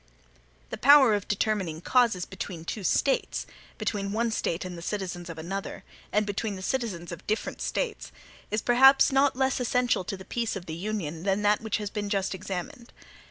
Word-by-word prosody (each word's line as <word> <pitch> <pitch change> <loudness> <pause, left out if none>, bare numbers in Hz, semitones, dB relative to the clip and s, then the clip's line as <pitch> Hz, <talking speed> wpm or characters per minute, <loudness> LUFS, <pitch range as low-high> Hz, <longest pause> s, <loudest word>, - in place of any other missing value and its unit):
The 220 - -5
power 275 -4 +8
of 205 -1 -1
determining 200 -6 -1
causes 225 -2 +2
between 185 -3 -7
two 205 +4 -4
States, 270 - +1 0.3
between 200 -1 -2
one 230 +1 0
State 175 -5 -2
and 180 -1 -6
the 170 - -8
citizens 175 -2 -4
of 165 - -7
another, 195 +4 -5 0.3
and 210 0 +2
between 205 +1 -2
the 190 - -8
citizens 190 -8 -2
of 170 - -9
different 215 +1 -2
States, 455 -3 -3 0.4
is 215 +1 -1
perhaps 265 +3 +6
not 270 0 +3
less 265 0 +1
essential 245 -4 +1
to 195 - -4
the 190 - -11
peace 235 -2 -2
of 190 -3 -6
the 160 - -6
Union 170 -3 -4
than 195 +2 0
that 205 0 +3
which 220 -2 -1
has 210 -2 -5
been 205 -1 -3
just 195 -1 0
examined. 200 +7 -6
205 Hz, 185 wpm, -27 LUFS, 185-235 Hz, 0.4 s, power